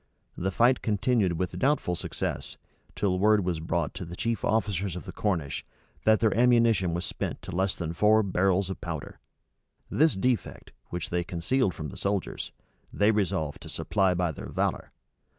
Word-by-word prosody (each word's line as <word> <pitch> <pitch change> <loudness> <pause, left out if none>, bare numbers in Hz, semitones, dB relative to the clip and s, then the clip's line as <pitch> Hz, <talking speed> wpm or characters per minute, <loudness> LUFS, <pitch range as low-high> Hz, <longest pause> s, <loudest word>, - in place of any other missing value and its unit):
The 95 - -1
fight 120 +6 +3
continued 105 -3 +1
with 90 +1 -3
doubtful 135 -9 +2
success, - - -4 0.4
till 90 -3 +1
word 105 -1 +4
was 90 -3 -1
brought 85 +1 -1
to - - -6
the 85 0 -7
chief 115 +3 -2
officers 100 -4 0
of 90 - -7
the - - -6
Cornish, 80 -10 -1 0.4
that 110 0 +5
their 110 -3 +3
ammunition 115 -7 +4
was 85 - -2
spent - - -4
to - - -6
less 95 +1 +1
than 85 -2 -4
four 105 +5 +4
barrels 95 0 +1
of - - -7
powder. 80 -4 -6 0.7
This 155 -5 +3
defect, 115 -1 -1 0.2
which 90 -2 -4
they 90 0 +1
concealed 90 +6 0
from 75 -2 -5
the - - -10
soldiers, 100 -2 -2 0.4
they 105 +2 +3
resolved 95 -8 -1
to - - -9
supply 95 -3 +1
by 90 -1 +1
their - - -8
valor. - - -1
95 Hz, 170 wpm, -28 LUFS, 85-110 Hz, 0.7 s, that